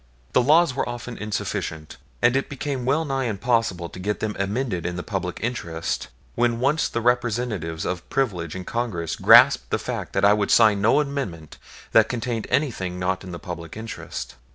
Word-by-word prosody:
The - - +5
laws 155 +3 +4
were 130 - -2
often 120 0 -6
insufficient, 80 -7 -4 0.3
and 120 +1 +5
it 135 - 0
became 135 -2 -3
well 155 +4 +2
nigh 135 -2 -1
impossible 110 -5 0
to - - -10
get 105 +3 -2
them 110 -1 -2
amended 100 -1 -1
in 90 - -3
the 90 - -4
public 95 -4 -3
interest 85 - -3 0.3
when 120 -1 +1
once 140 +5 +1
the 115 - -2
representatives 115 -9 0
of 90 -1 -4
privilege 95 - -1
in 95 -1 -6
Congress 105 -9 -2
grasped - - +6
the - - +1
fact - - -5
that - - +2
I 100 - +7
would 105 -1 0
sign 110 -3 +5
no 115 +8 +4
amendment 135 - -5 0.3
that 110 -1 +5
contained 120 -2 -3
anything 95 -11 -1
not 90 +1 -1
in 95 - -8
the 85 - -5
public 85 0 -7
interest. 110 0 -6
110 Hz, 180 wpm, -24 LUFS, 90-125 Hz, 0.3 s, I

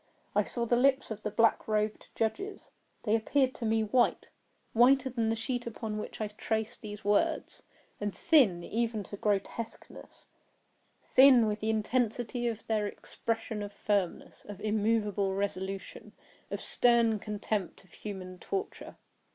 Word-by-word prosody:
I - - +5
saw 235 -1 -3
the 240 - +2
lips 265 0 +3
of 215 -1 -5
the 210 - -2
black 230 +2 +2
robed 215 0 -1
judges. 390 - -3 0.3
They 215 -1 +2
appeared 260 +4 +2
to 230 - -4
me 220 0 +2
white—whiter 250 +3 +1
than 230 -2 0
the 225 - +1
sheet 240 +2 -3
upon 215 -2 -4
which - - -7
I 215 - -1
trace 220 +2 -2
these 210 -1 -9
words—and 205 -1 -2
thin 210 - +4
even 225 0 -1
to 200 - -8
grotesqueness; 210 +3 -4 0.9
thin 260 -3 +8
with 210 0 -1
the 220 - -2
intensity 240 +2 0
of 225 -2 -4
their 215 -2 0
expression 225 0 -4
of 205 0 -5
firmness—of 205 0 -2
immoveable 210 -2 +1
resolution—of 195 -1 -5
stern 235 -3 +3
contempt 210 -3 -3
of 185 - -25
human 185 -3 -7
torture. 395 - -5
220 Hz, 135 wpm, -30 LUFS, 205-235 Hz, 0.9 s, thin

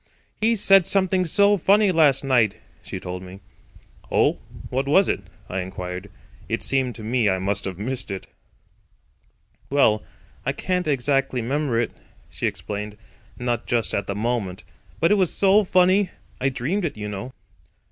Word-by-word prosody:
"He 230 +2 +3
said 195 -3 +5
something 190 -1 +2
so 200 +4 +4
funny 200 +3 +4
last 150 -6 +4
night," 120 -6 +3 0.3
she - - -7
told 90 0 -6
me. 95 +1 -10 0.7
"Oh, - - +2 0.3
what 135 +2 -1
was 190 +7 +4
it?" - - -1 0.3
I 95 - -3
inquired. 90 +1 -6 0.4
It - - -1
seemed 130 -3 0
to 110 - -9
me 115 -1 +1
I 95 - +1
must 100 +2 -1
have 95 -2 -4
missed 125 +5 -3
it. 95 -1 -5 1.4
"Well, 110 -7 +3 0.4
I - - -1
can't 180 -2 -2
exactly 135 -3 +1
'member 135 -1 0
it," 120 - -1 0.4
she - - -2
explained, 105 0 -5 0.4
"not 120 -1 -2
just 115 -3 0
at 100 - -1
the 100 - -3
moment. 105 -4 -2 0.4
But 165 - +3
it 210 - +4
was 185 -3 +3
so 200 +2 +4
funny. 185 +1 +3 0.3
I 135 - +1
dreamed 135 +11 -2
it, 160 -9 -3
you 105 0 -5
know." 105 +5 -6
130 Hz, 160 wpm, -23 LUFS, -, 1.4 s, said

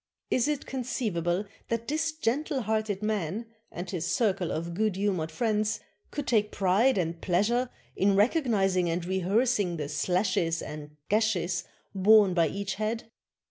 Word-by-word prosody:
Is 255 +1 +3
it 295 -2 -1
conceivable 210 -8 -1 0.2
that 230 0 -2
this 315 +2 0
gentle 295 0 -1
hearted 215 -2 -1
man, 210 0 -1 0.3
and 175 +2 -6
his 175 -3 -3
circle 195 -7 +1
of 170 +2 -3
good 215 +1 0
humored 190 -5 0
friends, 215 +4 0 0.3
could 290 -2 -4
take 210 -4 +2
pride 200 +7 +3
and 170 -2 -2
pleasure 230 +8 +1 0.3
in 195 0 +3
recog 255 - +3
nizing 195 -5 +2
and 170 +1 -1
rehearsing 190 0 +1
the 150 -2 -3
slashes 175 +1 +1
and 150 0 -8
gashes 195 -5 +1 0.3
borne 200 0 +6
by 170 -2 +3
each 200 +4 -3
head? 225 +1 -2
200 Hz, 145 wpm, -28 LUFS, 175-230 Hz, 0.3 s, borne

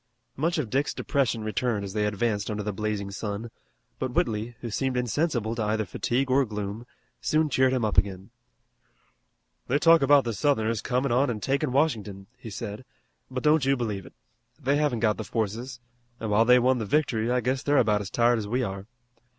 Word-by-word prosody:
Much 165 +5 0
of 130 -9 -2
Dick's 140 +3 0
depression 130 -6 0
returned 110 -1 -1
as 95 - -7
they 105 -1 +1
advanced 105 0 -1
under 105 -1 -3
the 105 0 -3
blazing 105 -1 -3
sun, 105 +3 -5 0.5
but 130 -1 -2
Whitley, 115 0 -1
who 115 - -5
seemed 130 +3 -1
insensible 125 -2 0
to 115 - -3
either 110 0 0
fatigue 130 +8 -1
or 135 +2 +4
gloom, 105 0 -5 0.3
soon 155 0 +1
cheered 130 -1 +3
him 125 -4 +1
up 105 - +3
again. 95 +1 -3 1.4
"They 135 - +2
talk 165 +2 +6
about 140 0 +5
the 115 - -2
Southerners 110 -2 +1
comin' 125 +1 0
on 130 +3 +3
an' 115 -3 -2
takin' 135 +4 0
Washington," 110 -9 0
he 125 -2 -10
said, 105 +2 -6 0.5
"but 130 -1 -4
don't 150 -1 +4
you 135 +1 +2
believe 105 -6 -3
it. - - -15 0.5
They 140 0 +1
haven't 145 -7 0
got 110 -2 +2
the - - -4
forces, 115 +4 -3 0.4
an' 110 -2 -3
while 110 +2 +4
they 125 +1 +7
won 125 +1 +3
the 110 - -3
victory 120 -5 +1
I 125 0 +2
guess 130 +2 -1
they're 145 0 +2
about 105 -4 +3
as 95 - -6
tired 120 +1 +3
as 105 - -5
we 125 +4 0
are. 100 -2 -5
120 Hz, 200 wpm, -26 LUFS, 105-130 Hz, 1.4 s, they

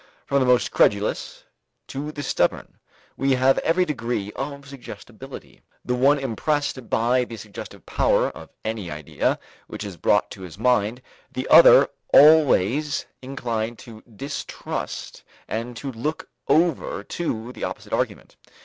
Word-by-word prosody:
From 140 - +2
the 130 - +2
most 125 -1 +3
credulous 100 +1 +1 0.5
to 145 +3 -4
the 145 -1 -6
stubborn, - - -1 0.4
we 135 0 +1
have 130 +1 +3
every 180 +3 +2
degree 120 - -3
of 140 +1 -5
suggestibility, 140 -2 -11 0.2
the 125 - 0
one 135 +4 +4
impressed 135 0 -2
by 125 +3 +2
the 115 -2 -8
suggestive 105 -1 -10
power - - +2
of - - -12 0.2
any 110 -5 -3
idea 75 -1 -1 0.3
which - - -7
is 100 -4 -7
brought 105 +5 +2
to 95 - -9
his 90 -1 -9
mind, 120 +1 +1 0.3
the 130 - -4
other 155 -3 +9 0.2
always 145 -2 +5 0.2
inclined 120 -4 -3
to 110 -2 -12
distrust 130 +5 -6 0.3
and 115 +2 -4
to 135 +3 -5
look 140 +7 -4 0.2
over 165 +2 +1
to 120 -8 -4
the - - -8
opposite - - -5
argument. - - -2
125 Hz, 140 wpm, -23 LUFS, 110-140 Hz, 0.5 s, other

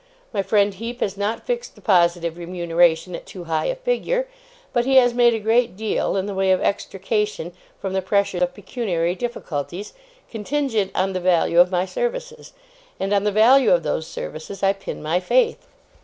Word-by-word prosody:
My 200 - +1
friend 200 +1 +2
Heep 230 +5 -6
has 195 - -1
not 205 +3 -3
fixed 485 -1 -3
the - - -17
positive 170 -4 +2
remuneration 170 0 +1
at - - -9
too 185 - -9
high 160 -2 -1
a - - -1
figure, - - -1 0.5
but 240 - +2
he 265 +2 +1
has 245 -2 +6
made 240 -1 +4
a - - -2
great 225 0 +1
deal, 220 -2 -1
in 190 - -1
the 205 - -4
way 190 0 +2
of 185 - +3
extrication 200 -2 -2 0.3
from 190 -1 -4
the 190 - 0
pressure 195 -1 0
of 180 0 0
pecuniary 190 -5 -2
difficulties, 185 - -5 0.3
contingent 225 -2 -1
on 190 +1 0
the 185 - -1
value 175 -1 +3
of 180 +1 +7
my 180 0 0
services; - - -4 0.5
and 195 +1 -1
on 200 0 +2
the 210 - +2
value 235 +4 +5
of 170 -2 +4
those 155 +1 -2
services 170 +6 -7
I 195 0 +4
pin 195 0 -7
my 160 +4 +1
faith. 470 - +1
195 Hz, 185 wpm, -22 LUFS, 180-235 Hz, 0.5 s, of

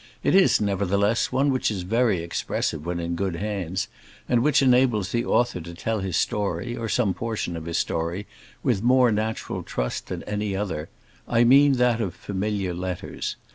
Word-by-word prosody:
It - - +2
is, 195 0 +5
nevertheless, 100 +2 +1
one 140 +2 +2
which 130 - +1
is 100 -4 -3
very 110 -2 +1
expressive 80 -2 -2
when 85 0 -2
in 85 0 -2
good 95 -1 -2
hands, 95 0 -3 0.4
and 120 -1 +3
which 140 +1 +3
enables 125 -6 +3
the 120 0 0
author 120 -7 +1
to 85 +1 -9
tell 110 +5 -2
his 95 -2 -1
story, 105 +5 -1
or 115 -2 -4
some 105 -4 +2
portion 110 -6 -3
of 80 -1 -6
his 85 0 -2
story, 85 +5 -2 0.4
with 95 - +1
more 125 0 +4
natural 110 +1 -2
trust - - -3
than - - -5
any 105 -1 -2
other, 95 -6 -3 0.4
I 115 0 +3
mean 140 +4 +6
that 125 -2 +2
of 95 -6 -3
familiar 100 -2 -2
letters. 90 0 -4
105 Hz, 175 wpm, -25 LUFS, 90-120 Hz, 0.4 s, mean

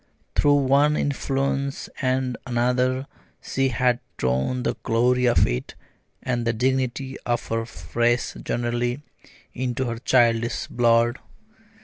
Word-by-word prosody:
Through 145 -1 +4
one 145 +3 +4
influence 140 0 -1
and 130 -1 0
another 125 +2 +1 0.3
she 135 0 0
had 125 -1 +1 0.2
drawn 65 - 0
the - - 0
glory 125 +2 +2
of 120 - +4
it, - - -3 0.5
and 120 -2 -1
the 115 0 +1
dignity 130 +2 -1
of 120 0 -2
her 115 0 -1 0.3
race 120 +1 +1
generally, 120 +3 -1 0.5
into 130 +1 -2
her 115 -1 -3
childish 120 -2 +2
blood. 120 0 +2
125 Hz, 115 wpm, -24 LUFS, 120-130 Hz, 0.5 s, Through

